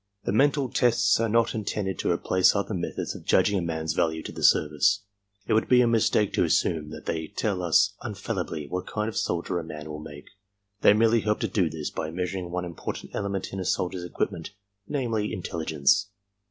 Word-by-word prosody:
The - - -1
mental 140 +4 +3
tests 115 -6 +3
are 115 -1 +1
not 115 +1 +2
intended 100 -3 -3
to - - 0
replace 90 +2 +3
other 100 +2 -1
methods 85 -2 -3
of - - -10
judging 100 -2 +3
a - - -2
man's 80 -2 -2
value 80 -1 0
to - - -6
the - - -7
service. 95 +8 +3 0.4
It 115 - 0
would 110 - +2
be 125 - +6
a - - +4
mistake 110 -2 +2
to - - +2
assume 75 -2 +1
that 80 - -9
they 80 -1 -2
tell 100 0 -2
us 100 +4 +3
infallibly 95 -7 -4
what 90 +5 -4
kind 105 +1 -2
of 110 - -5
soldier 85 -1 -1
a - - -5
man 75 -1 -8
will 75 - -6
make. 75 -1 -11 0.5
They - - +7
merely 115 +1 +3
help 105 0 0
to - - +1
do 90 -6 +1
this 80 -1 -5
by 80 - -4
measuring 90 +1 -3
one 90 0 -3
im 85 - -7
portant - - -6
element 100 -2 -3
in 95 - -4
a - - -2
soldier's 90 0 -1
equipment, 85 -1 -3 0.3
namely, 115 -7 -1
intelligence. 80 -2 +1
95 Hz, 205 wpm, -26 LUFS, 80-105 Hz, 0.5 s, They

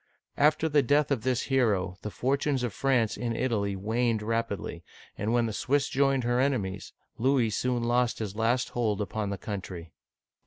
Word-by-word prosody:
After 155 +2 +4
the 150 -2 +4
death 145 +3 +2
of 130 -5 +1
this 125 +1 0
hero, 105 -9 +1
the 105 - -4
fortunes 135 +3 0
of 120 - -2
France 125 -5 +1
in 120 -1 -2
Italy 110 -5 0
waned 110 +2 0
rapidly, 105 -6 -3 0.3
and 105 +2 -2
when 120 0 +3
the 110 - -3
Swiss 140 +5 +1
joined 135 -1 +2
her 120 +1 +1
enemies, 105 -8 -1 0.3
Louis 125 -2 +2
soon 125 +2 0
lost 120 0 +1
his 105 -3 -4
last 115 +3 +1
hold 110 -4 -1
upon 105 0 -2
the 100 - -3
country. 90 -4 -6
120 Hz, 170 wpm, -28 LUFS, 105-130 Hz, 0.3 s, After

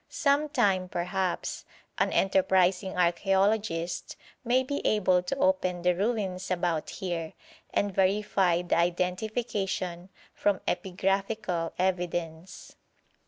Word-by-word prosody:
Some 290 +1 +1
time, 195 -10 +1
perhaps, 180 +1 -2 0.4
an - - +2
enterprising 190 0 +2
archæologist 190 0 +1 0.3
may 250 +2 +2
be 285 +2 -3
able 185 -4 +3
to 180 +10 -3
open 270 -12 +1
the 180 0 +4
ruins 190 -2 -2
about 175 -3 -1
here, 170 -4 -4 0.4
and 200 -1 0
verify 190 -2 +2
the 175 - +1
identification 180 0 -1 0.2
from 200 -2 +1
epigraphical 195 -2 -1
evidence. 175 -2 -3
185 Hz, 100 wpm, -28 LUFS, 175-205 Hz, 0.4 s, the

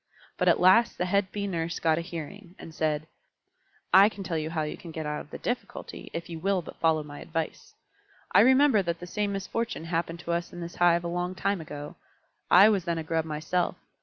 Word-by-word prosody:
But - - 0
at - - +5
last 190 +6 +5
the 180 - 0
head 195 +1 +1
Bee 205 -1 -3
Nurse 170 -3 -2
got 160 0 +2
a - - -2
hearing, 175 +2 -8
and 165 - -10
said, 155 -1 -1 0.9
"I 195 +3 +8
can 200 -2 -8
tell 170 -2 -3
you 155 0 -2
how 160 -1 -1
you 150 - -4
can 170 - -11
get 160 -1 -5
out 150 0 -3
of - - -14
the - - -7
difficulty, 245 +1 -5
if 170 - -5
you 165 -1 -7
will 190 +1 0
but - - -11
follow 160 -2 +2
my 145 -1 -10
advice. 165 -1 -5 0.6
I 190 - +6
remember 260 0 +6
that 170 -2 -3
the 175 - -7
same 205 +3 -2
misfortune 200 +1 -3
happened 165 0 -2
to 170 - -4
us 170 0 -2
in 175 - -8
this 170 0 -7
hive 175 -1 +4
a - - -3
long 175 +1 -2
time 195 -1 -1
ago. 145 -1 -8 0.5
I 190 +4 +8
was 200 -5 +2
then 170 -1 -1
a 160 - -3
Grub 160 0 -1
myself. 155 +3 -1
170 Hz, 225 wpm, -27 LUFS, 160-195 Hz, 0.9 s, I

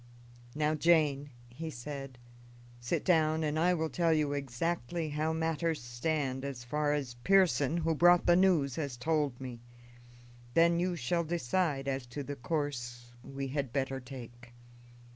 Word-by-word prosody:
"Now, 150 0 +1
Jane," 150 -3 +3 0.2
he 155 +7 -7
said, 135 -1 -7 0.6
"sit 120 0 -2
down, 160 -3 +3
and 155 0 0
I 180 +2 +3
will 160 -1 -2
tell 170 -2 +2
you 150 -2 +2
exactly 145 +3 -2
how 155 +2 -1
matters 160 0 -1
stand, 130 +2 -2
as 135 -3 -5
far 150 +4 0
as 140 -5 -2
Pearson, 180 -6 +3
who 165 -1 +1
brought 175 +2 +5
the 175 - +6
news, 170 -8 +3
has 140 -6 -3
told 145 -2 0
me. 125 -3 -7 0.9
Then 170 0 +5
you 180 0 0
shall 170 +4 0
decide 160 -2 -1
as 135 -2 -2
to 140 +4 -5
the 145 +1 -5
course 120 -4 -4
we 135 0 -5
had 140 -2 -2
better 135 0 -1
take." 120 -2 -11
145 Hz, 150 wpm, -31 LUFS, 130-165 Hz, 0.9 s, the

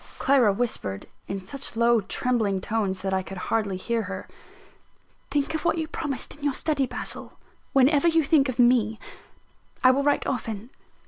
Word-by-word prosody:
Clara 265 -6 +4
whispered 195 - -3 0.2
(in 195 -1 -5
such 275 +3 -3
low, 235 0 +4
trembling 215 -2 0
tones 190 -2 -2
that 190 -1 -1
I 190 - +1
could 195 +1 -8
hardly 200 0 -1
hear 230 +4 -1
her): 195 -2 -6 1.0
"Think 290 +1 0
of 315 - -2
what 345 - +1
you 320 -1 -2
promised 280 -6 -3
in 295 - -16
your 285 -2 +1
study, 290 -4 +1
Basil, - - -4 0.4
whenever 280 +4 +4
you 325 -1 +4
think 280 -2 +3
of 255 - -4
me: 240 -3 +4 0.9
I 255 - +8
will 270 +2 +1
write 290 0 +1
often." 225 -2 -4
240 Hz, 170 wpm, -25 LUFS, 200-275 Hz, 1.0 s, I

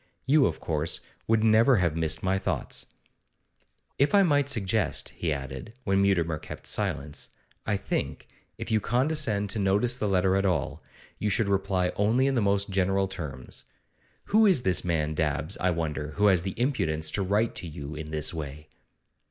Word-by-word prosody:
You, 140 0 +5
of - - -4
course, 80 0 -1 0.3
would 110 -1 +3
never 115 +4 +5
have 85 -6 +1
missed 80 -1 -1
my 95 +1 +1
thoughts.' - - -3 1.1
'If 145 +7 +3
I 200 - +6
might 145 -5 +2
suggest,' 110 -4 -1
he 85 - -3
added, 65 - -5
when 95 -3 +2
Mutimer 85 -5 +1
kept - - -9
silence, 70 +1 -2 0.4
I 105 - +1
think, - - -3 0.3
if - - -6
you 110 - +3
condescend 120 -4 0
to 110 - -2
notice 105 +6 +2
the 105 - -1
letter 95 -1 +2
at 95 - +1
all, 90 -3 -1 0.4
you 105 - 0
should 100 +1 +1
reply 95 -2 +1
only 110 +6 +3
in 135 - +2
the 120 - +1
most 100 0 +1
general 95 +1 +1
terms. 75 -9 -7 0.6
Who 220 +1 +4
is 175 -11 +3
this 95 -1 +2
man 80 -3 0
Dabbs, 75 -1 -1
I 90 - +2
wonder, 75 -3 -3
who 105 - +2
has 90 -3 +4
the 95 +4 -5
impudence 80 - 0
to 100 - -1
write 105 +4 +1
to 90 - -6
you 75 -1 -7
in 75 0 -7
this 75 0 0
way? 75 -1 -7
95 Hz, 175 wpm, -27 LUFS, 80-110 Hz, 1.1 s, I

